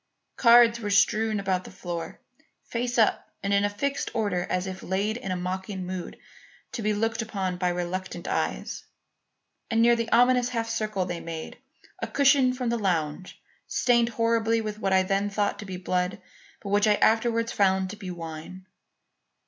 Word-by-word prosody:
Cards 235 Hz, -1 st, +6 dB
were 210 Hz, -3 st, -4 dB
strewn 215 Hz, +1 st, +3 dB
about 190 Hz, -2 st, -1 dB
the -, -, -10 dB
floor, 170 Hz, -2 st, -6 dB, 0.5 s
face 245 Hz, +1 st, -2 dB
up 220 Hz, -2 st, +2 dB
and 200 Hz, 0 st, 0 dB
in 200 Hz, 0 st, +3 dB
a 205 Hz, -, +2 dB
fixed 280 Hz, +7 st, -2 dB
order 200 Hz, -6 st, 0 dB
as 185 Hz, 0 st, -1 dB
if 190 Hz, -1 st, -6 dB
laid 200 Hz, +4 st, -1 dB
in 215 Hz, -5 st, -6 dB
a -, -, 0 dB
mocking 185 Hz, +1 st, -4 dB
mood 185 Hz, -1 st, -6 dB, 0.5 s
to 235 Hz, -, -4 dB
be 215 Hz, 0 st, +1 dB
looked 225 Hz, +2 st, 0 dB
upon 195 Hz, -4 st, -3 dB
by 180 Hz, 0 st, +1 dB
reluctant 175 Hz, 0 st, -4 dB
eyes; -, -, -2 dB, 0.9 s
and 225 Hz, -, +1 dB
near 235 Hz, +1 st, +6 dB
the 230 Hz, -1 st, -3 dB
ominous 245 Hz, +1 st, +4 dB
half 230 Hz, -2 st, -2 dB
circle 215 Hz, -4 st, -1 dB
they 175 Hz, -1 st, -4 dB
made, 165 Hz, -1 st, -7 dB, 0.4 s
a -, -, -3 dB
cushion 275 Hz, -2 st, +4 dB
from 250 Hz, -1 st, -2 dB
the 235 Hz, 0 st, 0 dB
lounge, 175 Hz, -3 st, -2 dB, 0.3 s
stained 235 Hz, -2 st, +2 dB
horribly 230 Hz, 0 st, +1 dB
with 215 Hz, -1 st, -4 dB
what 195 Hz, -2 st, -1 dB
I 190 Hz, 0 st, +4 dB
then 195 Hz, +2 st, 0 dB
thought 205 Hz, 0 st, -1 dB
to 210 Hz, -, -7 dB
be 185 Hz, -1 st, -5 dB
blood, 180 Hz, 0 st, -1 dB, 0.4 s
but 200 Hz, -, -6 dB
which 205 Hz, +2 st, +3 dB
I 210 Hz, -, +5 dB
afterwards 230 Hz, +1 st, +2 dB
found 190 Hz, -1 st, +2 dB
to -, -, -7 dB
be 195 Hz, -3 st, -8 dB
wine. 165 Hz, +2 st, -8 dB
205 Hz, 180 wpm, -26 LUFS, 185-230 Hz, 0.9 s, Cards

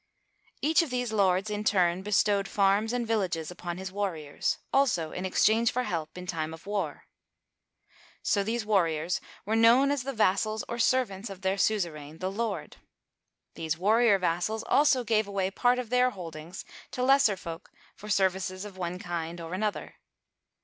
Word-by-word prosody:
Each 315 Hz, +3 st, +4 dB
of 330 Hz, -, -3 dB
these 245 Hz, -2 st, -2 dB
lords, 195 Hz, 0 st, +2 dB
in 210 Hz, 0 st, -2 dB
turn, 180 Hz, -3 st, +2 dB
bestowed 200 Hz, 0 st, +2 dB
farms 200 Hz, +2 st, +2 dB
and 245 Hz, -1 st, -1 dB
villages 180 Hz, -8 st, -1 dB
upon 175 Hz, -1 st, -6 dB
his 190 Hz, 0 st, -6 dB
warriors, 175 Hz, -8 st, -2 dB, 0.2 s
also 245 Hz, -, +2 dB
in 185 Hz, -, -4 dB
exchange 220 Hz, +4 st, +3 dB
for 250 Hz, -, -1 dB
help 160 Hz, -5 st, -4 dB
in 180 Hz, -, -7 dB
time 160 Hz, -2 st, -3 dB
of 165 Hz, -, -18 dB
war. 205 Hz, 0 st, -3 dB, 1.2 s
So 200 Hz, -, +2 dB
these 225 Hz, +2 st, -2 dB
warriors 170 Hz, -5 st, +1 dB, 0.2 s
were 215 Hz, +3 st, 0 dB
known 235 Hz, +5 st, +5 dB
as 285 Hz, -2 st, 0 dB
the 270 Hz, +2 st, -4 dB
vassals 215 Hz, -1 st, +1 dB
or 235 Hz, -, -5 dB
servants 230 Hz, -5 st, +1 dB
of 195 Hz, -1 st, -9 dB
their 190 Hz, +1 st, +1 dB
suzerain, 165 Hz, -8 st, -1 dB
the 185 Hz, +2 st, -3 dB
lord. 225 Hz, +3 st, -4 dB, 0.8 s
These 160 Hz, 0 st, -3 dB
war 210 Hz, +6 st, +3 dB
rior 220 Hz, -5 st, +4 dB
vassals 180 Hz, +5 st, -1 dB
also 285 Hz, -3 st, +3 dB
gave 220 Hz, -2 st, +1 dB
away 195 Hz, -1 st, -1 dB
part 245 Hz, +4 st, +2 dB
of 250 Hz, -2 st, -5 dB
their 250 Hz, 0 st, +4 dB
holdings 170 Hz, -4 st, -8 dB, 0.2 s
to 250 Hz, -, -3 dB
lesser 270 Hz, -6 st, +4 dB
folk 170 Hz, 0 st, -8 dB, 0.3 s
for 210 Hz, -, -11 dB
services 190 Hz, -1 st, 0 dB
of 195 Hz, -2 st, -10 dB
one 175 Hz, 0 st, -3 dB
kind 170 Hz, -1 st, -5 dB
or 165 Hz, +1 st, -7 dB
another. 210 Hz, +2 st, -3 dB
200 Hz, 170 wpm, -28 LUFS, 180-225 Hz, 1.2 s, known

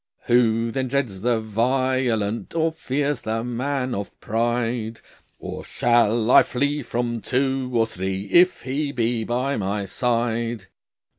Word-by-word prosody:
"Who 115 Hz, -1 st, +3 dB
then 130 Hz, +2 st, -1 dB
dreads 125 Hz, -8 st, -2 dB
the 120 Hz, 0 st, +2 dB
violent, 115 Hz, 0 st, 0 dB
Or 165 Hz, 0 st, +2 dB
fears 145 Hz, -3 st, -2 dB
the 110 Hz, +1 st, -2 dB
man 130 Hz, +2 st, -2 dB
of 100 Hz, 0 st, -5 dB
pride? 115 Hz, 0 st, -1 dB, 0.4 s
Or -, -, -7 dB
shall 120 Hz, -1 st, +2 dB
I -, -, +9 dB
flee 145 Hz, +3 st, -1 dB
from 120 Hz, -2 st, -2 dB
two 130 Hz, +1 st, 0 dB
or 115 Hz, -2 st, +3 dB
three 95 Hz, -2 st, -4 dB
If 180 Hz, +1 st, +5 dB
He 140 Hz, +3 st, -2 dB
be 120 Hz, -3 st, 0 dB
by 125 Hz, +5 st, -1 dB
my 100 Hz, 0 st, -2 dB
side?" 115 Hz, -1 st, -1 dB
120 Hz, 135 wpm, -23 LUFS, 115-130 Hz, 0.4 s, I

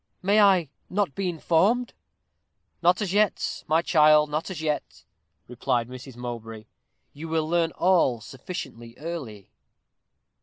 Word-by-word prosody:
"May 205 Hz, +3 st, +4 dB
I 185 Hz, -7 st, +4 dB, 0.2 s
not 195 Hz, -6 st, 0 dB
be 195 Hz, +2 st, -2 dB
informed?" 185 Hz, +9 st, +1 dB, 0.9 s
"Not 180 Hz, +4 st, +3 dB
as 190 Hz, -2 st, -3 dB
yet, 210 Hz, -1 st, 0 dB
my 160 Hz, +2 st, +2 dB
child 150 Hz, -3 st, +5 dB
not 155 Hz, +5 st, -2 dB
as 185 Hz, -, -6 dB
yet," 150 Hz, -, -3 dB, 0.4 s
replied 120 Hz, -1 st, -1 dB
Mrs. 130 Hz, 0 st, -10 dB
Mowbray. 115 Hz, -3 st, -7 dB, 0.5 s
"You 155 Hz, +3 st, -8 dB
will 160 Hz, -1 st, -1 dB
learn 170 Hz, 0 st, +1 dB
all 170 Hz, -10 st, +2 dB
sufficiently 120 Hz, -, -8 dB
early." 140 Hz, -, -7 dB
160 Hz, 125 wpm, -25 LUFS, 125-180 Hz, 0.9 s, child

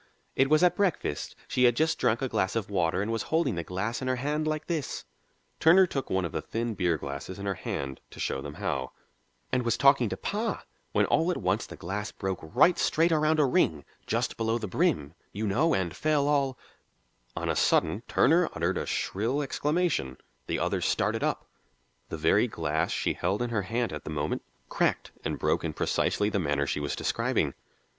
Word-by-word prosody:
It 135 Hz, 0 st, +3 dB
was 155 Hz, +2 st, +4 dB
at 180 Hz, -, +5 dB
breakfast; 180 Hz, -, -1 dB
she 125 Hz, -, +2 dB
had 120 Hz, -1 st, +5 dB
just 160 Hz, +3 st, +1 dB
drunk 115 Hz, +4 st, +1 dB
a -, -, +1 dB
glass 95 Hz, -5 st, 0 dB
of 105 Hz, -3 st, -2 dB
water 90 Hz, 0 st, +1 dB
and 110 Hz, -, -2 dB
was 115 Hz, -, -1 dB
holding 160 Hz, -6 st, +2 dB
the 85 Hz, -2 st, -3 dB
glass 100 Hz, +8 st, -3 dB
in 130 Hz, -, -3 dB
her 130 Hz, -, +1 dB
hand 150 Hz, +4 st, -1 dB
like 155 Hz, 0 st, -2 dB
this" 160 Hz, -6 st, -3 dB, 0.5 s
Turner 180 Hz, +4 st, +7 dB
took 135 Hz, -6 st, -4 dB
one 95 Hz, -1 st, +1 dB
of 85 Hz, -, -4 dB
the -, -, -2 dB
thin 115 Hz, 0 st, -3 dB
beer 90 Hz, -5 st, +1 dB
glasses 70 Hz, +6 st, -6 dB
in 100 Hz, -, -6 dB
her 100 Hz, -, 0 dB
hand 70 Hz, -6 st, -5 dB
to -, -, -13 dB
show 65 Hz, -, -1 dB
them -, -, -7 dB
how 65 Hz, -3 st, -3 dB, 0.6 s
"and 130 Hz, -, +2 dB
was 115 Hz, -1 st, 0 dB
talking 135 Hz, -3 st, +5 dB
to -, -, -4 dB
pa, 215 Hz, +3 st, -2 dB, 0.3 s
when -, -, +3 dB
all 165 Hz, +2 st, +2 dB
at 180 Hz, -, 0 dB
once 95 Hz, +4 st, 0 dB
the -, -, -9 dB
glass 105 Hz, +4 st, -4 dB
broke 95 Hz, -2 st, -3 dB
right 80 Hz, -, +3 dB
straight 165 Hz, +2 st, +3 dB
around 155 Hz, 0 st, +3 dB
a 150 Hz, -, +5 dB
ring, 80 Hz, -, +1 dB, 0.2 s
just -, -, -1 dB
below 115 Hz, 0 st, +1 dB
the 110 Hz, -, -4 dB
brim, 75 Hz, -4 st, 0 dB, 0.2 s
you 105 Hz, +2 st, -2 dB
know, 150 Hz, +11 st, +2 dB
and 90 Hz, -2 st, -2 dB
fell 150 Hz, +1 st, +1 dB
all 140 Hz, -3 st, +1 dB, 0.4 s
" -, -, -41 dB
On -, -, -3 dB
a -, -, +1 dB
sudden 80 Hz, +8 st, +2 dB
Turner 165 Hz, +4 st, +4 dB
uttered 85 Hz, +3 st, 0 dB
a -, -, -4 dB
shrill 120 Hz, +9 st, -1 dB
exclamation; 150 Hz, -, 0 dB, 0.3 s
the -, -, 0 dB
others -, -, 0 dB
started -, -, 0 dB
up; -, -, -1 dB, 0.6 s
the -, -, -4 dB
very 90 Hz, +9 st, +3 dB
glass 80 Hz, -6 st, -1 dB
she -, -, 0 dB
held 95 Hz, +4 st, -1 dB
in 120 Hz, -, -3 dB
her 110 Hz, -3 st, +1 dB
hand 115 Hz, +2 st, -2 dB
at 75 Hz, -, -6 dB
the -, -, -7 dB
moment 75 Hz, -1 st, -2 dB, 0.3 s
cracked -, -, 0 dB
and -, -, -2 dB
broke -, -, +1 dB
in -, -, -2 dB
precisely 105 Hz, -, +1 dB
the 105 Hz, -1 st, 0 dB
manner 75 Hz, -4 st, 0 dB
she 75 Hz, -, -2 dB
was 70 Hz, -1 st, -2 dB
describing. -, -, 0 dB
110 Hz, 210 wpm, -28 LUFS, 85-145 Hz, 0.6 s, Turner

